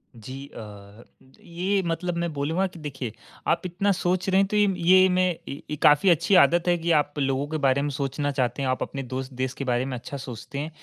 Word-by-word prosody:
जी, 130 +5 -9
अ, 105 0 -11 0.4
ये 185 +3 -1
मतलब 170 +1 -2
मैं 170 -1 -1
बोलूँगा 160 +7 0
कि 175 -2 -13
देखिए 135 -6 -5 0.4
आप - - +2
इतना 190 +3 0
सोच 185 0 0
रहे 190 +1 +4
हैं 195 - +1
तो 210 - 0
इम 205 -2 +3
ये 185 +2 +6
मैं 185 0 +2 0.2
ये 145 +2 -6
काफ़ी 150 +6 +6
अच्छी 175 +4 +3
आदत 175 +1 +1
है 175 0 +3
कि 170 +1 -1
आप 145 0 -2
लोगों 135 0 0
के 155 +1 -3
बारे 135 +1 +3
में 145 - -1
सोचना 140 +1 -2
चाहते 130 0 -1
हैं, 135 - 0
आप 130 - -1
अपने 135 -1 -5
दोस्त 130 +1 -5
देश 130 0 -1
के 140 - -6
बारे 120 +2 +1
में 130 -2 -4
अच्छा 140 +4 -7
सोचते 130 +1 -7
हैं। 150 - -3
145 Hz, 225 wpm, -25 LUFS, 130-175 Hz, 0.4 s, ये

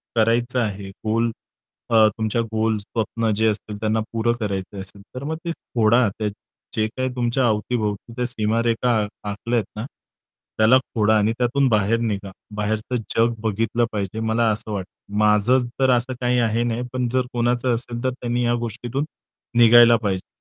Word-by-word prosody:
करायचं 120 +3 +2
आहे 100 -3 -2 0.2
गोल 115 +2 +1 0.6
अ, 110 -2 +6
तुमच्या 110 +1 0
गोल, 110 -1 0
स्वप्न 110 +2 -2
जे 110 +1 +2
असतील, 105 -1 -2
त्यांना 110 0 +1
पुरं 115 +1 +1
करायचं 100 -2 -3
असेल, 95 +1 -9
तर 130 - -5
मग 160 +2 -2
ते 170 - -1
खोडा. 120 -5 +2 0.7
जे 110 0 +1
काही 130 +3 -3
तुमच्या 120 +1 +1
अवतीभोवती 105 0 -1
त्या 125 0 -1
सीमारेषा 115 +1 0 0.4
आखल्या 115 +4 -2
आहेत - - -3
ना, 110 +3 -4 0.7
त्याला 110 +4 +6
खोडा 110 -4 +1
आणि 105 +2 +2
त्यातून 130 +3 +2
बाहेर 110 +1 +2
निघा. 100 -4 -2 0.2
बाहेरचं 110 +3 -2 0.2
जग 115 +1 +3
बघितलं 115 +2 +1
पाहिजे 105 +1 -3
मला 110 +1 +1
असं 110 +1 -3
वाटतं. 100 +1 -6
माझं 105 +4 +4
तर 130 - +3
असं 125 +1 +1
काही 125 0 +2
आहे 115 0 +1
नाही 120 0 -1
पण 125 -1 0
जर 130 -1 +2
कोणाचं 120 0 +1
असेल, 120 +1 -5
तर 130 - +2
त्यांनी 120 -1 -2
या 120 - +2
गोष्टीतून 120 +5 -3 0.5
निघायला 120 0 +8
पाहिजे. 100 -4 -2
115 Hz, 160 wpm, -22 LUFS, 110-120 Hz, 0.7 s, निघायला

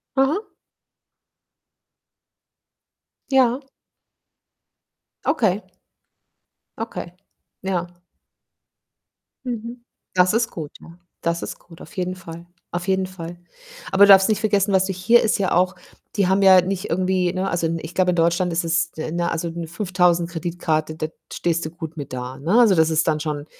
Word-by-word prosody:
Aha. 270 +9 +2 2.9
Ja. 260 -1 +3 1.6
Okay. 215 - +1 1.2
Okay, 220 -6 -6 0.5
ja. 185 -2 -2 1.6
Mhm. 235 0 -5 0.3
Das 180 +1 +4
ist 230 +1 +1
gut, 155 -4 -6
ja. 170 +1 -14 0.2
Das 170 0 -1
ist - - -6
gut, 165 -2 -16
auf - - -13
jeden 185 0 -2
Fall, 170 -1 -10 0.2
auf 175 +2 -4
jeden 190 0 +1
Fall. 175 -2 -8 0.5
Aber 195 +1 +7
du - - +1
darfst 195 0 +8
nicht 215 - +1
vergessen, 205 -2 +1
was 190 0 +4
du 190 - -2
hier 190 +6 +4
ist 220 - +1
ja 195 - 0
auch 180 +2 +2 0.4
die 195 -3 +3
haben 190 +1 +2
ja 190 -1 +8
nicht 185 +2 -2
irgendwie, 185 0 +1
ne 190 +1 -2
also, 170 -1 0
ich 165 +2 -9
glaube, 185 -1 +3
in 180 - +2
Deutschland 170 +2 +2
ist 170 +1 -1
es 165 0 +1
ne, 170 +2 -2
also, 165 +1 -2
'ne 165 0 -6
5.000 175 -1 +1
Kreditkarte, 165 -2 -2
da 155 - -3 0.2
stehst 170 -1 -1
du 155 - -3
gut 165 -1 -8
mit 145 -3 -7
da, 125 +1 -5
ne? 175 - +2
Also, 220 -6 +6
das 160 -1 +4
ist 160 0 +1
dann 155 -1 +1
schon, 150 -1 -3
180 Hz, 155 wpm, -22 LUFS, 165-195 Hz, 2.9 s, darfst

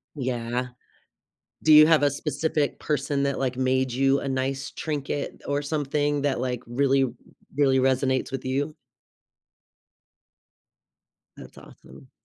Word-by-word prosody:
Yeah. 125 -2 -2 1.0
Do 155 - +6
you 155 0 +9
have 160 -2 +4
a 145 - +5
specific 150 0 -2
person 140 -1 -1
that, 140 -1 -1
like, 130 -2 -2
made 130 0 +1
you 135 +2 +2
a - - -5
nice 135 +1 -2
trinket 145 -2 -4
or 145 0 0
something 145 0 -1
that, 140 -3 0
like, 125 -1 -2
really 135 +2 +2 0.5
really 135 -2 +3
resonates 130 0 +1
with 135 -1 -4
you? 140 +4 -2 2.6
That's - - -13
awesome. 130 - -16
135 Hz, 120 wpm, -25 LUFS, 130-145 Hz, 2.6 s, you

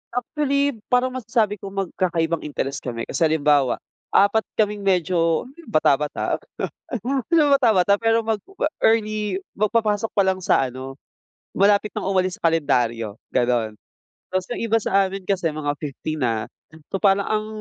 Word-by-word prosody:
Actually, 280 +1 0
parang 250 +1 +2
masasabi 230 -5 0
kong 195 0 -3
magkakaibang 170 -3 0
interest 140 -2 -3
kami. 115 -2 -5
Kasi 165 - +1
halimbawa, 145 -4 +3 0.4
4 200 +2 +4
kaming 210 -1 +1
medyo 170 -3 +2 0.2
bata-bata, 150 -6 +1 0.6
hindi 265 - -3
naman 295 -4 +5
bata-bata 205 -7 +4
pero 225 +2 +2
mag-early, 215 - 0 0.2
magpapasok 215 0 +1
pa 200 - +3
lang 190 0 +1
sa 135 - +3
ano, 130 +2 -8 0.5
malapit 200 +1 +3
nang - - -4
umalis 185 -1 0
sa - - +1
kalendaryo, 120 -9 0 0.2
gano'n. 120 -3 +1 0.6
Tapos 185 -1 -1
yung - - -4
iba 225 - +3
sa 195 -3 +2
amin 195 0 -7
kasi 185 -4 +1
mga 150 -1 -2
50 150 +1 -4
na. 115 -4 0 0.5
So, 195 - -1
parang 200 -1 +3
ang 215 0 -1
195 Hz, 140 wpm, -22 LUFS, 150-220 Hz, 0.6 s, naman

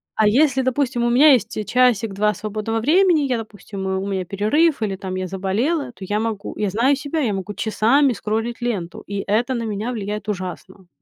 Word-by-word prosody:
а 215 - +3
если, 265 +4 +3
допустим, 255 -2 0
у 240 - +2
меня 280 +4 +7
есть 230 -2 0
часик-два 215 -4 +2
свободного 215 +3 -3
времени, 335 - +4
я, 245 - +1
допустим, 205 -3 -7
у 190 +1 -2
меня 190 -2 -2
перерыв, 225 - +1
или, 200 -3 -1
там, 185 -1 -6
я 185 0 -3
заболела, 220 - -1
то 200 - -12
я 210 +2 -1
могу, 220 -2 -4
я 205 -2 0
знаю 245 +8 +2
себя, 285 +3 -3
я 230 -8 0
могу 195 +2 -4
часами 245 +6 +2
скроллить 225 +4 -3
ленту, 195 -9 -3
и 200 0 -4
это 235 +6 +1
на 235 - -2
меня 220 +2 -3
влияет 210 -2 -4
ужасно. 185 -1 -6
220 Hz, 190 wpm, -21 LUFS, 200-250 Hz, -, меня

